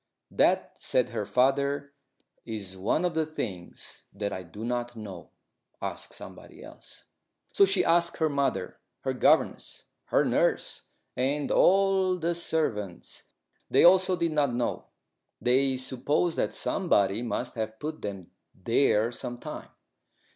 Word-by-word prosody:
"That," - - +2
said 125 -2 +1
her 110 -3 -4
father, 140 +4 +1 0.5
"is 105 -5 -5
one 105 - 0
of 175 - 0
the 160 0 +1
things 100 - -7
that 100 -1 -4
I 95 - -4
do 100 +6 -9
not 120 0 -3
know; 100 -6 -9 0.5
ask - - -6
somebody - - -12
else." - - -11 0.5
So 200 - +6
she 195 -1 +2
asked 170 0 +2
her 160 - +2
mother, 140 -2 -1 0.2
her - - -1
governess, - - +1 0.2
her - - +2
nurse, - - 0 0.3
and 140 +3 -1
all 190 -1 +4
the 170 0 0
servants. 115 - -2 0.4
They - - +4
also 185 +1 +6
did 170 -2 -1
not 145 -5 +1
know. 120 0 -2 0.5
They 130 +2 +2
supposed 135 +6 0
that - - -1
somebody 105 - +1
must 120 +1 -3
have 110 -1 -4
put 155 +5 -6
them 95 -4 -6 0.2
there 115 +2 +2
some 120 0 -6
time. - - -8
130 Hz, 135 wpm, -28 LUFS, 110-160 Hz, 0.5 s, So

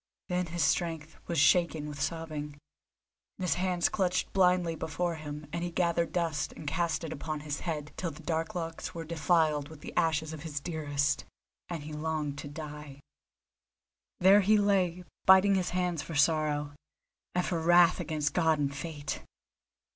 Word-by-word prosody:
Then 180 0 0
his 170 -1 -1
strength 160 0 0
was 170 - -2
shaken 160 0 +3
with 150 -1 -6
sobbing, 155 -3 -3 0.8
and - - -5
his 180 - +2
hands 180 -1 +1
clutched 185 -2 0
blindly 180 -3 +3
before 170 +3 -2
him, 150 -1 -7
and 170 0 -2
he 175 - -1
gathered 170 -1 +1
dust 165 -4 -1
and 155 - -10
cast 165 +3 0
it 160 - -4
upon 155 +1 -4
his 150 0 -4
head 150 -4 -4
till 175 - -2
the 160 +1 -11
dark 160 +1 -2
locks 165 -1 -4
were 165 - -4
defiled 155 -2 +1
with 160 -2 -12
the - - -8
ashes 160 -1 +1
of 155 - -7
his 150 -3 -4
dearest, 145 -2 -1 0.4
and 165 -4 -4
he 155 +1 -7
longed 150 -2 -2
to - - -6
die. 150 -1 -8 1.2
There 195 +3 +7
he 210 +2 +4
lay, 185 -4 +2 0.2
biting 190 +1 +7
his 185 -2 +1
hands 180 -3 -1
for 160 - -7
sorrow, 150 -1 +2 0.6
and 180 - +1
for 170 - -1
wrath 175 +2 +5
against 155 -3 -1
God 160 -3 +3
and 140 -1 -1
Fate. 145 -2 -5
160 Hz, 170 wpm, -30 LUFS, 150-175 Hz, 1.2 s, There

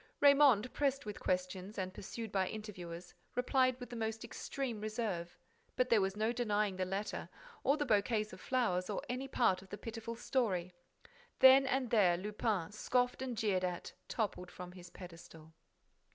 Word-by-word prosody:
Raymonde, 275 -5 +6
pressed 275 -2 0
with 210 -1 -6
questions 185 +2 -2
and 185 -1 -3
pursued 225 +3 -6
by 190 -2 +1
interviewers, 180 -5 -7 0.2
replied 255 0 +2
with 245 - -8
the - - -5
most 225 0 -3
extreme 235 -1 -4
reserve. 215 -6 -3 0.4
But 255 0 +2
there 225 -3 +5
was 195 +1 -1
no 220 +2 +1
denying 210 -5 0
the 185 - 0
letter, 195 +3 -3 0.3
or 280 +3 +3
the 295 - 0
bouquets 215 -1 +1
of - - -10
flowers, 200 -8 0
or 205 - -2
any 255 +2 -3
part 190 -8 +2
of 190 - -16
the 205 - -6
pitiful 225 +1 -6
story! 195 -8 0 0.6
Then 265 +1 +8
and 260 -3 0
there, 185 -6 +5
Lupin, 205 -1 -1
scoffed 250 +4 0
and 255 -3 -3
jeered 195 -4 +1
at, 180 -1 -3
toppled 195 -5 -2
from 180 0 -8
his 180 -1 -11
pedestal. 165 -3 -12
215 Hz, 165 wpm, -35 LUFS, 185-245 Hz, 0.6 s, Then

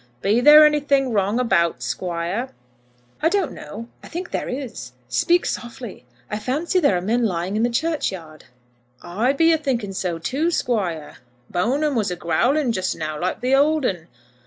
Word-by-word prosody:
"Be 215 +5 +3
there 300 +3 +9
anything 285 -3 +2
wrong 205 +3 +1
about, 170 - +1
Squire?" 175 - -3 0.7
"I 320 - +3
don't 390 -4 0
know. 230 +3 -9
I - - -12
think 350 +2 -6
there - - -3
is. 245 - -6
Speak 340 - +2
softly. 240 - -6 0.2
I 210 - -4
fancy 295 - 0
there 285 - +3
are - - -2
men 230 +6 0
lying 185 -2 -1
in 215 - +1
the 240 - +2
churchyard." 220 - -3 0.6
"I 220 +9 0
be 325 +3 +4
a 320 - +1
thinking 240 -9 -2
so, 180 -3 -2
too, 275 - -1
Squire. 190 - -2 0.3
Bone'm 275 +11 0
was 220 -6 0
a 180 - -3
growling 250 - +1
just 185 -4 -1
now 155 -1 -4
like 185 +4 -2
the 255 +2 +1
old 295 +1 +3
'un." 170 -6 -2
235 Hz, 170 wpm, -22 LUFS, 180-285 Hz, 0.7 s, there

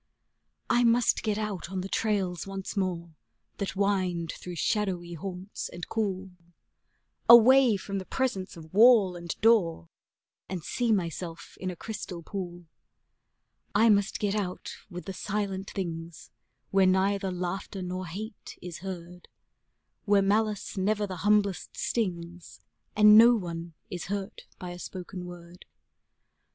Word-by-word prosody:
I 245 - +3
must 235 0 +3
get 215 -2 -1
out 210 -5 -3
on 190 -1 -3
the 190 - -5
trails 195 -4 -1
once 195 +1 -5
more 175 -4 -2 0.4
that 200 -2 -3
wind 185 -4 0
through 180 -1 -8
shadowy 180 -2 -1
haunts 185 +3 -6
and 175 - -7
cool, 195 -4 -2 1.0
Away 240 0 +8
from 195 0 -4
the 185 - -7
presence 195 -9 -2
of 160 0 -12
wall 215 -4 +6
and 170 -2 -6
door, 180 - +3 0.6
and 180 -4 -4
see 240 +6 0
myself 170 -3 -3
in 185 - -2
a 180 - -5
crystal 180 -3 -6
pool; 175 -2 -6 1.1
I 225 +3 +6
must 200 -1 +3
get 205 -1 0
out 195 -4 -3 0.2
with 180 -2 -8
the 195 - -5
silent 195 -1 -3
things, 165 - -6 0.4
where 195 -1 +5
neither 195 +1 +2
laughter 180 +2 -4
nor 180 0 -4
hate 205 +5 -8
is 175 -2 -8
heard, 180 -1 -8 0.8
Where 200 -1 +4
malice 210 +1 0
never 205 +2 +1
the 185 -2 -6
humblest 205 0 +1
stings 175 -5 -3 0.4
and 210 0 +8
no 240 +1 +8
one 170 -4 -5 0.2
is 175 -2 -4
hurt 200 0 -5
by 180 -2 -7
a 175 - -8
spoken 180 0 -7
word. 175 0 -12
190 Hz, 140 wpm, -28 LUFS, 175-210 Hz, 1.1 s, Away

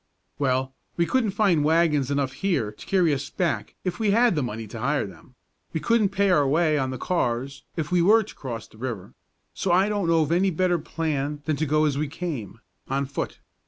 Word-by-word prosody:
"Well, 130 -1 0 0.2
we 170 - +3
couldn't 245 +2 +1
find 185 -8 +3
wagons 155 -3 +3
enough 140 -2 0
here 135 - -1
to 105 - -13
carry 180 -5 +3
us 140 0 -3
back 175 -3 -2
if 180 +2 -3
we 220 -2 +1
had 230 +2 +4
the 150 - 0
money 115 -3 -4
to 110 +2 -8
hire 140 +5 0
them; 95 +6 -14 0.4
we 160 - 0
couldn't 230 +1 +2
pay 200 0 +2
our 145 -5 +4
way 155 +2 +3
on 130 -1 -1
the 130 - -4
cars 135 -3 -2
if 160 0 -3
we 180 -1 +4
were 215 +6 +5
to 210 - -12
cross 115 -4 -6
the 110 - -19
river; 115 -7 -5 0.4
so 190 - -1
I 190 +4 +4
don't 205 -4 0
know 165 -1 +4
of 150 - -3
any 185 +3 +3
better 180 0 +1
plan 150 -2 -3
than 155 - +1
to 155 - -1
go 155 +2 +3
as 145 -2 0
we 150 - 0
came, 140 - -5 0.3
on 135 +1 0
foot. 140 +1 -5
150 Hz, 220 wpm, -25 LUFS, 135-180 Hz, 0.4 s, were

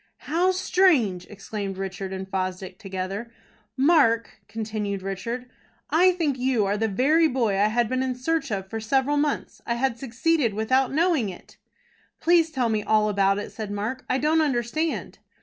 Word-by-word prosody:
"How 345 +4 +2
strange!" 335 - +2
exclaimed 200 -1 -5
Richard 195 0 -5
and 190 0 -5
Fosdick 185 -1 -4
together. 195 +4 -5 0.5
"Mark," 265 -6 +3
continued 210 -2 -4
Richard, 230 +6 -4 0.4
"I 360 +3 +5
think 300 -7 -1
you 250 -4 +1
are 200 +1 0
the 220 +1 0
very 290 - +3
boy 245 -7 0
I 200 +2 +3
had 235 +2 +1
been 255 +3 -1
in 260 -1 -1
search 275 +1 -1
of 195 -2 -3
for 225 +3 -5
several 265 +6 +1
months. 290 -1 -2
I 235 - -1
had 240 -1 -1
succeeded 265 -1 0
without 255 +5 +1
knowing 310 - +2
it." 180 - -12 0.6
"Please 335 -1 +4
tell 255 -6 0
me 215 -1 0
all 215 0 +2
about 195 -1 +2
it," 205 - -5
said 215 -2 -6
Mark. 210 +6 -3
"I 255 - +2
don't 310 +3 +2
understand." 290 +3 -1
235 Hz, 165 wpm, -25 LUFS, 200-280 Hz, 0.6 s, I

